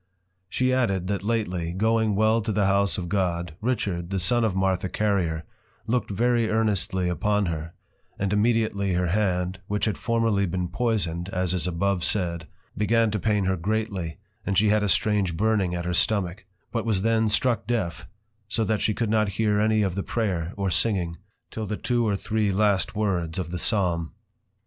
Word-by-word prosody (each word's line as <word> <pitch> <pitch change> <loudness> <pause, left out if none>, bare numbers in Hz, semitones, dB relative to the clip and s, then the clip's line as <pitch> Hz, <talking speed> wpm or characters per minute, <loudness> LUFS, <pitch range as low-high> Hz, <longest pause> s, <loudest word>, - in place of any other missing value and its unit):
She 130 +4 +1
added, 100 -8 +1
that 100 -3 -1
lately, 95 -6 -1
going 110 +2 +1
well 110 +2 +3
to 110 +1 -2
the 105 -1 +1
House 100 0 +2
of 90 -2 -4
God, 90 -3 -1
Richard, 100 -8 -1
the 100 - -1
son 120 +6 +3
of 110 -4 0
Martha 95 -1 0
Carrier, 90 -7 0 0.4
look'd 115 -1 0
very 115 +2 +1
earnestly 100 -4 +1
upon 105 +4 +1
her, 80 -1 -4 0.4
and 100 0 -1
immediately 105 -3 +1
her 90 0 0
hand, 90 -2 0
which 105 0 0
had 110 - -2
formerly 115 -4 +1
been 90 0 -2
poisoned, 90 -6 -1
as 90 -2 0
is 90 -1 0
abovesaid, 90 -2 0 0.3
began 115 +1 +2
to 105 - -1
pain 105 -1 +1
her 95 0 +1
greatly, 95 -3 -2 0.3
and 100 - -1
she 105 +2 +4
had 105 0 +3
a 105 - 0
strange 100 -5 +1
Burning 100 -3 +1
at 85 0 -3
her 90 - -1
stomach; 95 0 0 0.2
but 115 -2 -1
was 105 -5 0
then 115 -1 +2
struck 115 0 +1
deaf, 110 -9 -2 0.4
so 115 +1 0
that 110 0 0
she 105 - +1
could 115 -3 -1
not 110 -2 +2
hear 105 -2 +2
any 110 0 +3
of 95 -3 0
the 100 - -2
prayer, 95 -7 -2
or 100 -2 -1
singing, 90 -3 0 0.4
till 110 -1 -4
the 105 - -3
two 120 -2 0
or 100 - +1
three 105 0 0
last 100 0 +1
words 90 -6 -1
of 85 -3 -3
the 90 - -3
Psalm. 85 -6 +1
100 Hz, 180 wpm, -25 LUFS, 90-110 Hz, 0.4 s, she